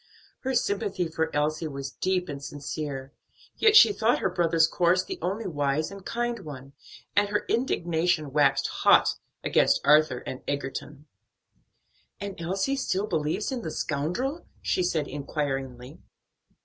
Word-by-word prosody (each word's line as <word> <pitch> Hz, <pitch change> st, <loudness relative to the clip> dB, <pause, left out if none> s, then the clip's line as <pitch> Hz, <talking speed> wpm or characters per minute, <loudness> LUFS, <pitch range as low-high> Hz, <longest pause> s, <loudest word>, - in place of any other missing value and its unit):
Her 265 Hz, 0 st, -2 dB
sympathy 200 Hz, -5 st, 0 dB
for 160 Hz, 0 st, -1 dB
Elsie 155 Hz, +2 st, 0 dB
was 140 Hz, -2 st, -6 dB
deep 185 Hz, +2 st, -1 dB
and 140 Hz, -2 st, -6 dB
sincere; 140 Hz, -1 st, -5 dB, 0.4 s
yet 435 Hz, -1 st, +5 dB
she 425 Hz, -, +9 dB
thought 230 Hz, -, +2 dB
her 190 Hz, -, -1 dB
brother's 165 Hz, -2 st, +3 dB
course 175 Hz, +2 st, +2 dB
the -, -, -6 dB
only 195 Hz, +6 st, -2 dB
wise 145 Hz, 0 st, -1 dB
and 200 Hz, -1 st, -10 dB
kind 240 Hz, +2 st, -2 dB
one, 140 Hz, -6 st, -10 dB, 0.4 s
and 205 Hz, 0 st, +3 dB
her 205 Hz, 0 st, -1 dB
indignation 170 Hz, -, 0 dB
waxed 140 Hz, -2 st, +3 dB
hot -, -, +4 dB, 0.3 s
against -, -, +3 dB
Arthur 150 Hz, -4 st, +4 dB
and 130 Hz, -, -6 dB
Egerton. 140 Hz, +1 st, -4 dB, 1.1 s
"And 200 Hz, -1 st, -5 dB
Elsie 190 Hz, +11 st, -1 dB
still 200 Hz, -6 st, 0 dB
believes 170 Hz, -, -1 dB
in 255 Hz, -2 st, -3 dB
the 160 Hz, -, -4 dB
scoundrel?" 180 Hz, -, -2 dB, 0.2 s
she -, -, +1 dB
said 160 Hz, -5 st, 0 dB
inquiringly. 135 Hz, -3 st, -4 dB
160 Hz, 140 wpm, -27 LUFS, 145-195 Hz, 1.1 s, she